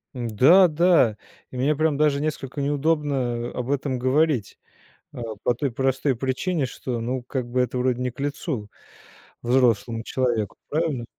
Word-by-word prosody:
Да-да. 150 - +4 0.3
И 130 - -7
мне 145 +4 +2
прям 155 -1 +1
даже 145 -1 +2
несколько 145 -2 -3
неудобно 140 -5 0
об 125 +2 -4
этом 135 -2 -1
говорить, 130 -2 +1 0.5
а, 120 - -7 0.2
по 120 - +2
той 135 +1 -2
простой 135 +2 0
причине, 135 +5 -1
что, 125 -1 -5
ну, 125 +2 -3
как 125 0 -4
бы 125 +1 +1
это 125 0 -2
вроде 125 0 0
не 125 0 -1
к 125 - -20
лицу 140 - -3 0.7
взрослому 120 -2 +1
человеку, 120 -6 -1
правильно? 150 -6 -1
130 Hz, 145 wpm, -24 LUFS, 120-145 Hz, 0.7 s, Да-да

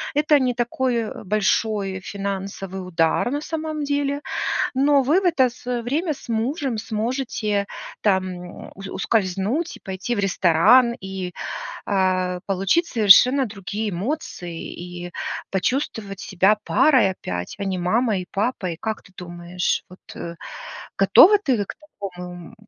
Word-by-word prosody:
Это 295 0 +4
не 255 -2 +1
такой, 245 +1 0
э, 230 -2 -3
большой 205 -1 0
финансовый 195 -1 -5
удар 165 +6 +1
на 290 - -1
самом 310 -1 -3
деле. 285 0 0 0.5
Но 280 +1 +4
вы 300 +8 +4
в - - -4
это 275 -8 +4
с 240 - -16 0.2
время 305 +7 0
с 265 - -14
мужем 250 +3 -1
сможете 215 -2 -2 0.3
там 185 -3 -2
ус 195 0 -8
ускользнуть 205 - -1
и - - -24
пойти 190 +5 -3
в - - -2
ресторан, 200 +6 +5
и, 190 -2 -5 0.5
а, 185 -2 +1
получить 195 - +1
совершенно 250 - +6
другие 210 0 -4
эмоции, 180 - -4
и 175 0 -8 0.4
почувствовать 200 -1 -2
себя 195 +3 +3
парой 260 -10 +4
опять, 90 - -5
а 200 - -2
не 190 -1 -1
мамой 205 +3 +1
и - - -17
папой. 195 -6 -1
Как 220 -1 -3
ты - - -19
думаешь, 175 0 -2
вот 185 - -14 1.0
готова 415 +2 +7
ты 260 - 0
к - - -7
такому, 205 -11 -9 0.4
м, - - -15
210 Hz, 135 wpm, -23 LUFS, 190-260 Hz, 1.0 s, готова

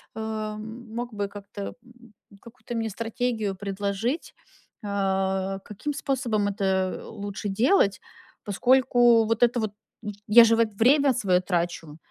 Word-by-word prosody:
эм, 220 +1 -6
мог 240 0 -4
бы 205 -1 -2
как-то, 200 0 -10 0.2
м, 240 -2 -19 0.3
какую-то 240 0 -9
мне 225 -1 -1
стратегию 225 -1 -2
предложить, 200 - -3 0.5
э, 195 -1 -1
каким 215 +8 -5
способом 250 -7 -1
это, 200 0 -3 0.3
э, - - -9
лучше 205 -1 -6
делать, 215 - +3 0.4
поскольку, 240 +1 +4
вот 225 +2 +1
это 240 0 +3
вот, 215 -2 -2 0.5
я 230 +3 +9
же, 230 0 +4
вот, 225 -2 +1
время 270 +6 +4
свое 190 -7 +2
трачу. 170 -4 -2
220 Hz, 130 wpm, -25 LUFS, 200-240 Hz, 0.5 s, я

